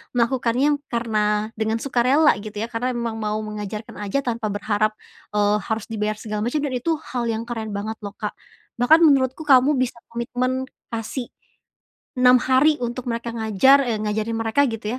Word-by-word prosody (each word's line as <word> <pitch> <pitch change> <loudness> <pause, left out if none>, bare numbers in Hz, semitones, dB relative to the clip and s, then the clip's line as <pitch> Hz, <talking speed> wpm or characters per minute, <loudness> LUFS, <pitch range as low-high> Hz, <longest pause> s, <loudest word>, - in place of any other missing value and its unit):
melakukannya 250 +3 +2 0.2
karena 215 -3 0
dengan 220 0 0
sukarela 275 +4 +3
gitu 215 0 -9
ya, 225 - -2
karena 245 +2 -1
emang 235 -1 -2
mau 215 0 -1
mengajarkan 210 0 -6
aja 205 +7 0
tanpa 230 -2 -1
berharap, 205 +1 0 0.4
eee, 205 0 +3
harus 220 0 -3
dibayar 215 -1 -1
segala 210 -1 -3
macem, 245 +6 0
dan 280 -3 -2
itu 320 +7 0 0.2
hal 245 -2 -1
yang 225 +1 -3
keren 225 -3 -4
banget 215 +2 -3
loh, 205 - -5
Kak. 210 - -4 0.5
Bahkan 315 +7 +6
menurutku 270 +1 +3
kamu 270 +1 +6
bisa 255 -1 0 0.2
komitmen 255 +2 -2 0.3
kasih 230 +2 -4 0.9
6 250 0 +7
hari 270 +4 +4
untuk 240 +1 -4
mereka 235 0 -3
ngajar, 225 +5 +4
e 225 - 0
ngajarin 215 +1 -2
mereka 225 +6 +2
gitu 225 +2 -4
230 Hz, 165 wpm, -22 LUFS, 215-255 Hz, 0.9 s, 6